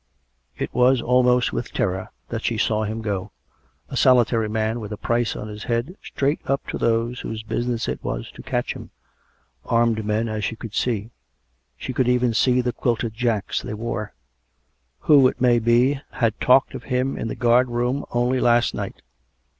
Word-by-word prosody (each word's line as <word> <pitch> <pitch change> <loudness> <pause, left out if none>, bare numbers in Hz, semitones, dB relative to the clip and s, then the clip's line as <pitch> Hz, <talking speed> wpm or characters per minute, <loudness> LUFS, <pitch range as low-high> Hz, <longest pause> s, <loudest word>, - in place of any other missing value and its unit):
It - - -4
was 125 +1 +4
almost 125 0 +3
with 120 - -3
terror 95 -6 -1 0.2
that - - -3
she - - 0
saw 110 -1 +1
him 110 +1 -4
go 100 -3 -2 0.3
— - - -40
a - - -4
soli 125 -2 +5
tary 115 -2 -1
man, 110 +2 -1
with 105 -2 -7
a 105 - -4
price 120 +1 0
on 105 - -6
his 105 0 -8
head, 120 +9 -1
straight 140 +3 -1
up 135 +1 0
to - - -3
those 115 +1 0
whose 110 0 -5
business 120 +1 -2
it - - -4
was - - -4
to - - -11
catch - - -2
him - - -10 0.4
— - - -39 0.3
armed 115 -2 +1
men, 110 +2 0
as 110 -1 -3
she 115 - -2
could 115 -2 -9
see 115 -2 -1 0.3
— 65 +2 -47
she 130 - -5
could 130 -1 +1
even 125 -1 +2
see 125 +3 +3
the 125 -1 -2
quilted 115 -1 -1
jacks 115 -3 -1
they 120 - -5
wore 110 -1 -4 0.4
— 60 +2 -47
who, 140 -4 +6
it 125 - -3
may 120 -1 +4
be, 120 +5 +3
had 115 -2 0
talked 130 +2 +4
of - - -8
him 130 +1 0
in 115 - -4
the - - -4
guard 120 +1 +3
room 120 +3 -1
only 120 +2 +1
last 120 0 +3
night. - - -6
120 Hz, 200 wpm, -23 LUFS, 110-125 Hz, 0.4 s, who